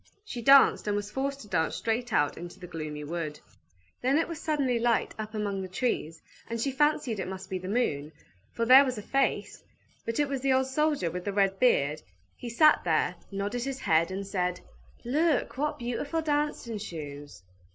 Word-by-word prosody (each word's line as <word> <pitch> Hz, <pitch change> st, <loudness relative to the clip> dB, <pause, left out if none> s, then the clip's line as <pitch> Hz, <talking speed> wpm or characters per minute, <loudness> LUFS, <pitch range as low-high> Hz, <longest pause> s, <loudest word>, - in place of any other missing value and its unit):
She 245 Hz, -, -6 dB
danced, 275 Hz, -2 st, +6 dB
and 205 Hz, -, +1 dB
was 205 Hz, 0 st, -3 dB
forced 275 Hz, +3 st, -2 dB
to 210 Hz, -, -11 dB
dance 160 Hz, -5 st, 0 dB
straight 235 Hz, +1 st, -2 dB
out 145 Hz, -6 st, +2 dB
into 175 Hz, 0 st, -9 dB
the 180 Hz, -, -8 dB
gloomy 155 Hz, -3 st, -6 dB
wood. 155 Hz, -1 st, -4 dB, 0.6 s
Then 265 Hz, +3 st, +2 dB
it 330 Hz, -, +1 dB
was 335 Hz, -3 st, -6 dB
suddenly 275 Hz, -6 st, 0 dB
light 235 Hz, -1 st, +1 dB
up 215 Hz, 0 st, -5 dB
among 200 Hz, -2 st, -2 dB
the 190 Hz, -, -5 dB
trees, 180 Hz, -5 st, -2 dB, 0.3 s
and 230 Hz, 0 st, -3 dB
she 275 Hz, +4 st, 0 dB
fancied 265 Hz, -5 st, +1 dB
it 190 Hz, -, -3 dB
must 190 Hz, 0 st, -7 dB
be 185 Hz, -, -2 dB
the 185 Hz, -, -7 dB
moon, 155 Hz, -10 st, -1 dB, 0.4 s
for 230 Hz, -, -1 dB
there 260 Hz, +3 st, +9 dB
was 255 Hz, -3 st, -2 dB
a 210 Hz, -, -6 dB
face; 270 Hz, +4 st, -1 dB, 0.4 s
but 230 Hz, +3 st, -3 dB
it 290 Hz, -, +3 dB
was 275 Hz, -2 st, -3 dB
the 270 Hz, 0 st, +2 dB
old 260 Hz, 0 st, +3 dB
soldier 280 Hz, -, 0 dB
with 180 Hz, +1 st, -5 dB
the 200 Hz, -, -2 dB
red 195 Hz, -1 st, +2 dB
beard; 150 Hz, -, +3 dB, 0.3 s
he 240 Hz, -, -7 dB
sat 305 Hz, +7 st, +5 dB
there, -, -, +1 dB, 0.2 s
nodded 205 Hz, +5 st, -2 dB
his 270 Hz, 0 st, -4 dB
head, 165 Hz, +1 st, +3 dB
and 195 Hz, +1 st, -4 dB
said, 180 Hz, -2 st, -1 dB, 0.5 s
"Look, 295 Hz, +2 st, +1 dB
what 300 Hz, +1 st, 0 dB
beautiful 285 Hz, +7 st, -2 dB
dancing 290 Hz, -7 st, -1 dB
shoes!" 145 Hz, -, -8 dB
225 Hz, 195 wpm, -28 LUFS, 180-270 Hz, 0.6 s, there